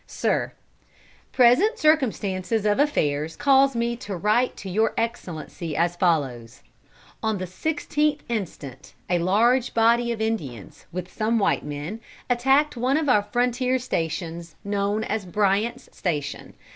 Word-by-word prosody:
"Sir, -, -, -1 dB, 0.8 s
Present 270 Hz, -, +4 dB
circumstances 220 Hz, -, +1 dB
of 205 Hz, +2 st, +2 dB
affairs 155 Hz, -, +1 dB
cause 275 Hz, -1 st, +4 dB
me 235 Hz, 0 st, 0 dB
to 205 Hz, -6 st, -6 dB
write 215 Hz, +7 st, +1 dB
to 195 Hz, -, -8 dB
Your 215 Hz, +4 st, +1 dB
Excellency, 170 Hz, -8 st, -4 dB
as 170 Hz, +1 st, +1 dB
follows: 135 Hz, -10 st, -1 dB, 0.6 s
On 220 Hz, -1 st, 0 dB
the 185 Hz, -, -4 dB
sixteenth 295 Hz, -, -1 dB
instant, 185 Hz, -, -6 dB, 0.2 s
a 175 Hz, -, +3 dB
large 230 Hz, +8 st, +2 dB
body 235 Hz, +1 st, +3 dB
of 230 Hz, -, -3 dB
Indians, 150 Hz, -, -4 dB
with 180 Hz, +1 st, -6 dB
some 225 Hz, +1 st, 0 dB
white 205 Hz, -, +1 dB
men, 150 Hz, +9 st, -6 dB, 0.3 s
attacked 270 Hz, +5 st, +3 dB
one 255 Hz, +4 st, +1 dB
of 310 Hz, -3 st, 0 dB
our 210 Hz, -5 st, +5 dB
frontier 250 Hz, +4 st, 0 dB
stations, 170 Hz, -6 st, -4 dB
known 205 Hz, +1 st, -1 dB
as 220 Hz, -1 st, -2 dB
Bryant's 210 Hz, +6 st, 0 dB
Station. 145 Hz, -6 st, -3 dB
215 Hz, 130 wpm, -24 LUFS, 175-245 Hz, 0.8 s, our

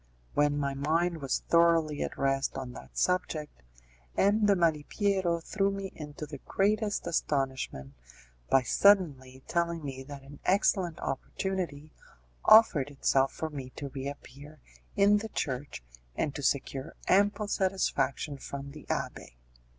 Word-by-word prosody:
When 145 Hz, 0 st, +2 dB
my 140 Hz, -1 st, -1 dB
mind 160 Hz, +4 st, 0 dB
was 135 Hz, -2 st, -1 dB
thoroughly 165 Hz, -3 st, +3 dB
at -, -, -3 dB
rest 135 Hz, 0 st, 0 dB
on 130 Hz, -2 st, -5 dB
that 65 Hz, -, -12 dB
subject, 155 Hz, -, -1 dB, 0.6 s
M. 205 Hz, +2 st, +4 dB
de 200 Hz, -, +5 dB
Malipiero 170 Hz, +2 st, +1 dB
threw 195 Hz, +4 st, 0 dB
me 195 Hz, -1 st, -4 dB
into 150 Hz, 0 st, -7 dB
the 145 Hz, -2 st, -9 dB
greatest 205 Hz, -, 0 dB
astonishment 135 Hz, -, -2 dB, 0.6 s
by 135 Hz, -, +4 dB
suddenly 135 Hz, -, +3 dB
telling 170 Hz, -2 st, -1 dB
me 135 Hz, -1 st, -5 dB
that 140 Hz, 0 st, -9 dB
an 140 Hz, +1 st, -13 dB
excellent 185 Hz, -3 st, +2 dB
opportunity 155 Hz, +1 st, -3 dB, 0.5 s
offered 170 Hz, -, +6 dB
itself 135 Hz, -1 st, +2 dB
for 160 Hz, -1 st, -5 dB
me 135 Hz, -3 st, -6 dB
to 140 Hz, -, -5 dB
reappear 140 Hz, +2 st, -8 dB, 0.4 s
in 205 Hz, +1 st, +5 dB
the 220 Hz, +2 st, -4 dB
church 135 Hz, -, -4 dB, 0.3 s
and 145 Hz, -, -1 dB
to 145 Hz, -, -5 dB
secure 140 Hz, +2 st, -1 dB
ample 205 Hz, +2 st, +3 dB
satisfaction 155 Hz, -8 st, 0 dB
from 140 Hz, +1 st, -7 dB
the 150 Hz, 0 st, -12 dB
abbé. -, -, -4 dB
150 Hz, 135 wpm, -29 LUFS, 135-185 Hz, 0.6 s, offered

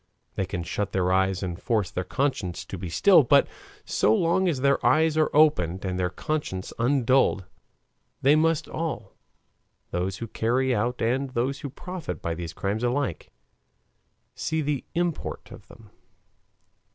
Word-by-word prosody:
They 95 Hz, -, -2 dB
can 90 Hz, -2 st, -4 dB
shut 100 Hz, +4 st, -3 dB
their 90 Hz, -1 st, +1 dB
eyes 95 Hz, 0 st, +1 dB
and 90 Hz, -2 st, -4 dB
force 110 Hz, -6 st, 0 dB
their 90 Hz, -, -2 dB
conscience 95 Hz, -5 st, -2 dB
to -, -, -7 dB
be 90 Hz, -1 st, -6 dB
still, 185 Hz, -, +6 dB
but 125 Hz, -, +4 dB, 0.4 s
so 110 Hz, -, +2 dB
long 175 Hz, +5 st, +2 dB
as 140 Hz, -6 st, -2 dB
their 140 Hz, 0 st, +2 dB
eyes 160 Hz, 0 st, +3 dB
are 155 Hz, -1 st, +3 dB
opened 100 Hz, -, +3 dB
and 90 Hz, -1 st, -2 dB
their 90 Hz, -1 st, +1 dB
conscience 95 Hz, -, -4 dB
undulled, 130 Hz, -5 st, +2 dB, 0.8 s
they 140 Hz, +3 st, +6 dB
must 160 Hz, 0 st, +2 dB
all 165 Hz, -1 st, -4 dB, 0.8 s
those 90 Hz, +2 st, -2 dB
who 115 Hz, -, -5 dB
carry 125 Hz, +4 st, 0 dB
out 120 Hz, +2 st, -1 dB
and 130 Hz, +4 st, 0 dB
those 130 Hz, +2 st, -1 dB
who 140 Hz, -, -5 dB
profit 170 Hz, -, -6 dB
by 85 Hz, -, -3 dB
these 85 Hz, 0 st, -6 dB
crimes 100 Hz, +7 st, -3 dB
alike 125 Hz, -, -1 dB, 1.0 s
see 160 Hz, 0 st, -2 dB
the 145 Hz, -2 st, -1 dB
import 175 Hz, -2 st, -3 dB
of -, -, -12 dB
them. 110 Hz, -2 st, -16 dB
120 Hz, 155 wpm, -26 LUFS, 95-150 Hz, 1.0 s, still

